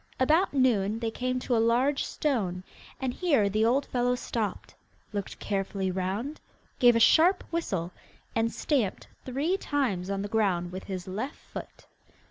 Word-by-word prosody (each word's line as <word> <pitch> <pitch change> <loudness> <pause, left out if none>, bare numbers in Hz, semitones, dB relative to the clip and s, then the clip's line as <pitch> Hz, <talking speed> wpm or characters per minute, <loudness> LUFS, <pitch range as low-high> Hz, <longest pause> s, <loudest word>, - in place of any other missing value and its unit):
About 310 +8 +3
noon 225 -6 +2
they 230 -1 -2
came 255 +2 -2
to 245 - 0
a 225 - +3
large 250 +5 +2
stone, 195 -11 -1 0.4
and 260 -2 -1
here 280 - +2
the 215 +2 +1
old 255 +5 +3
fellow 245 0 +1
stopped, 220 -5 -3 0.4
looked 200 -2 -4
carefully 195 -1 -2
round, 195 +11 -3 0.4
gave 240 -1 +6
a - - +4
sharp 345 - +5
whistle, 190 - -2 0.4
and 230 0 +1
stamped 250 -11 -1 0.2
three 285 +9 0
times 230 - -1
on 195 0 -1
the - - -3
ground 190 -5 +1
with 185 +1 -7
his 185 -2 -5
left 215 +9 -4
foot. - - -10
230 Hz, 155 wpm, -28 LUFS, 195-265 Hz, 0.4 s, gave